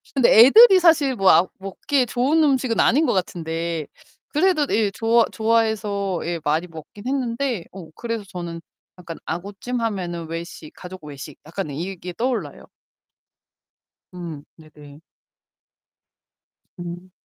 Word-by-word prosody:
근데 260 -3 +4
애들이 385 - +9
사실 315 -6 +3
뭐 195 -4 +3
아 170 +3 +5
먹기에 245 +8 -1
좋은 265 +7 +1
음식은 260 -5 +1
아닌 295 +6 +4
것 - - +1
같은데 165 -3 -3 0.4
그래도 310 -1 +2
예 215 -2 +1
좋아 225 +2 +2
좋아해서 220 -4 0
예 170 0 -3
많이 160 +3 0
먹기는 165 +7 -11
했는데 250 -5 -2
어 180 -4 -11
그래서 230 -2 -4
저는 175 -2 -7 0.4
약간 170 -2 -9
아구찜 200 +7 -5
하면은 175 -7 -3
외식, 165 -2 -7
가족 185 -1 -11
외식 145 0 -9
약간 170 +2 -5
이 140 +3 -5
이게 180 -1 -7
떠올라요. 245 +6 -3 1.5
음. 170 -5 -8
네네. 150 -2 -16 1.8
음. 175 +1 -8
195 Hz, 260 characters per minute, -22 LUFS, 170-240 Hz, 1.8 s, 애들이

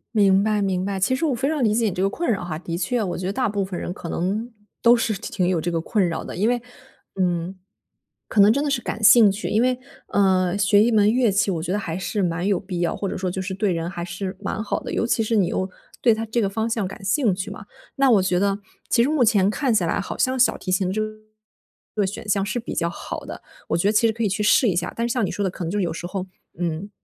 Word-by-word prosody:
明 195 -2 +5
白 215 -1 +1
明 190 -2 0
白。 195 -1 -2
其 200 +7 +2
实 265 - -4
我 285 -5 +1
非 265 +4 -1
常 300 -3 0
理 215 -2 +3
解 230 +1 +1
你 210 - +1
这 180 - -3
个 195 - +2
困 340 +11 -3
扰 200 -4 -1
哈， 165 -3 -4
的 170 -1 -4
确， 240 +5 0
我 185 - -3
觉 180 - -5
得 195 - -2
大 255 +3 0
部 205 -1 -1
分 190 -2 -5
人 175 - -4
可 170 - -8
能 210 +9 -2 0.3
都 235 +1 +6
是 230 -2 0
挺 195 -2 -2
有 180 -3 +1
这 175 - -2
个 165 - 0
困 190 +3 +1
扰 160 - -4
的。 - - -7
因 210 +6 +1
为， 245 0 0 0.6
嗯， 175 0 0 0.7
可 210 - +3
能 205 +2 +7
真 280 +5 +1
的 295 - -1
是 255 -3 0
感 215 0 -5
兴 215 -1 +8
趣， 200 +2 -4
因 215 +1 +2
为， 255 0 +1 0.3
呃， 190 -2 +2
学 205 +1 +4
一 235 - +2
门 210 -1 +4
乐 245 -3 +3
器， 195 0 +1
我 165 -3 -2
觉 175 - -3
得 200 - +1
还 165 -4 -4
是 195 +2 -2
蛮 175 +1 -1
有 200 -2 +2
必 185 -3 -5
要， 175 - 0
或 200 - -3
者 - - -4
说 185 0 -2
就 185 +1 -3
是 190 +1 -4
对 200 0 0
人 165 0 -2
还 175 -1 -5
是 185 +2 -5
蛮 215 - -3
好 205 - -2
的， - - -7
尤 - - 0
其 230 - +1
是 225 +1 0
你 195 -5 +3
又 185 0 -2 0.3
对 235 - +5
它 225 +1 -3
这 225 +2 -1
个 200 - +1
方 220 +3 -2
向 220 -4 -1
感 195 - -10
兴 205 0 +2
趣 195 +2 -5
嘛。 200 0 -9 0.3
那 275 -1 +3
我 210 -4 +5
觉 180 -1 +1
得， 200 +1 +1 0.3
其 235 - +4
实 265 - +1
目 300 -4 +3
前 205 -4 +4
看 250 +3 0
起 205 - +2
来 165 - 0
好 - - -5
像 260 0 +1
小 250 - +4
提 185 - -5
琴 185 0 +1
这 215 +3 -1 0.9
个 205 -2 +1
选 205 +2 -7
项 200 -1 +1
是 245 - -2
比 230 - -6
较 170 0 0
好 170 - -6
的， - - -8 0.3
我 - - +1
觉 175 - +1
得 - - +4
其 220 +2 +4
实 220 - 0
可 230 +1 -3
以 210 - +2
去 200 +2 -2
试 225 +4 +4
一 180 - 0
下。 180 +1 -1
但 235 0 -1
是 235 - -1
像 245 - 0
你 - - -3
说 205 - -2
的 190 - 0
可 185 - -6
能 165 - -3
就 205 - -1
有 175 -4 0
时 175 +1 -6
候， 190 0 -4 0.3
嗯， 175 +3 -3
200 Hz, 315 characters per minute, -23 LUFS, 185-225 Hz, 0.9 s, 兴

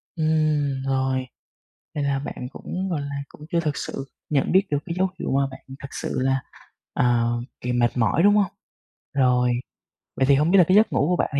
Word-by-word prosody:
Ừm, 155 -4 +1
rồi. 130 -1 0 0.7
Nên 145 -1 -1
là 140 -1 +1
bạn 130 -2 -6
cũng, 185 +6 -5
gọi 160 -4 -1
là, 140 0 -5
cũng 150 - -13
chưa 170 - +2
thực 150 -4 -1
sự 135 - -5 0.2
nhận 140 -3 +1
biết 190 +1 +5
được 145 - +1
cái 170 - -3
dấu 190 +1 +3
hiệu - - -3
mà 135 0 +2
bạn - - -10 0.2
thật 140 - -7
sự - - -3
là, 135 0 +1 0.5
ờ, 120 -1 +2 0.3
kỳ 125 - -2
mệt 120 0 +1
mỏi, 120 +8 +2
đúng 205 +1 +6
hông? 200 -3 +2 0.6
Rồi. 125 -2 +3 0.7
Vậy 130 - +2
thì 140 +1 +5
hông 150 +4 +2
biết 195 - +6
là 185 - +8
cái 185 - +4
giấc 220 - +4
ngủ 145 - +2
của 180 - +2
bạn - - 0
là 140 - +2
140 Hz, 215 wpm, -24 LUFS, 130-165 Hz, 0.7 s, là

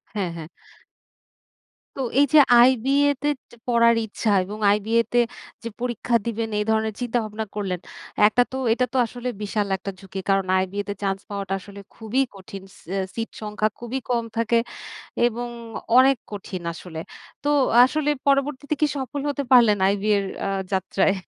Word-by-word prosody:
হ্যাঁ 190 -5 -1
,হ্যাঁ। 160 - -7 1.5
তো - - -9 0.2
এই 285 - +6
যে 310 - +9 0.2
আইবিএ 260 +4 +4
তে 290 - 0 0.2
যে - - -14
পড়ার 235 -1 +4
ইচ্ছা 220 +1 -3
এবং 205 +3 -7
আইবিএ 220 +3 +2
তে 245 - +5 0.4
যে - - -4
পরীক্ষা 240 -1 -1
দিবেন, 230 -1 -2
এই - - +1
ধরনের 220 -1 +1
চিন্তাভাবনা 220 -3 -2
করলেন। 190 -4 -2 0.5
একটা 215 +3 +3
তো 260 - -4 0.2
এটা 250 +2 +1
তো - - 0
আসলে 245 +2 -7
বিশাল 210 0 -1
একটা 195 +1 -6
ঝুঁকি। 195 0 -7
কারণ 195 -1 +3
আইবিএ 190 +2 -1
তে 200 - -1
চান্স 195 -1 0
পাওয়াটা 200 -2 -4
আসলে 200 +1 -12 0.2
খুবই 225 +4 -1
কঠিন। 195 0 -10
সি - - -18
অ্যা 195 0 0
সিট 230 0 -3
সংখ্যা 215 0 -1
খুবই 240 +2 -4
কম 240 -2 +1
থাকে 230 0 +2 0.7
এবং 240 +1 -3 0.5
অনেক 265 +1 +6
কঠিন 195 -3 -6
আসলে। 165 -1 -9 0.5
তো - - +1 0.4
আসলে 295 +3 0 0.2
পরবর্তীতে 280 +1 +1
কি 305 - +5
সফল 275 +1 -4
হতে 285 0 -1
পারলেন 235 -5 +7
আইবিএর 200 0 +1 0.2
অ্যা - - -2 0.2
যাত্রায়? 190 +1 +1
220 Hz, 160 wpm, -23 LUFS, 200-245 Hz, 1.5 s, যে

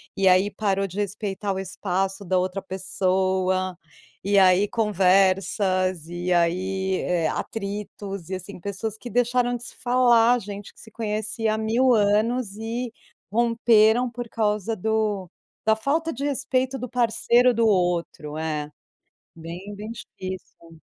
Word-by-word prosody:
e 195 -1 +2
aí 185 +2 +5
parou 195 -2 -1
de 185 +1 -10
respeitar 205 0 -2
o 190 - -3
espaço 190 +1 -2
da 185 0 +1
outra 185 +2 -2
pessoa. 185 -1 0 0.5
E 200 0 +4
aí 190 +2 +5
conversas 190 -3 +2
e 175 +1 -3
aí, 185 +2 +1
eh, 170 -3 0
atritos 200 -3 -5
e, 190 - -2
assim, 185 +2 -8
pessoas 200 +4 -4
que 245 - -8
deixaram 245 +1 +1
de 240 - -12
se - - -10
falar, 245 -1 +4
gente 205 -1 -8
que - - -21
se 220 - -13
conhecia 215 0 -2
há - - -1
mil 235 +4 +3
anos 215 +1 +2
e 230 +2 -4 0.4
romperam 230 +1 +4
por 240 0 -7
causa 215 -1 0
do 210 -2 -1 0.4
da 220 0 +4
falta 315 +8 0
de 275 - -5
respeito 270 -1 0
do 250 - -5
parceiro 245 +1 +3
do 230 0 +2
outro, 175 -6 0
é. 155 -2 -3 0.7
Bem, 170 +5 -8
bem 210 +2 -7
difícil. 185 -6 -9
205 Hz, 140 wpm, -24 LUFS, 185-225 Hz, 0.7 s, aí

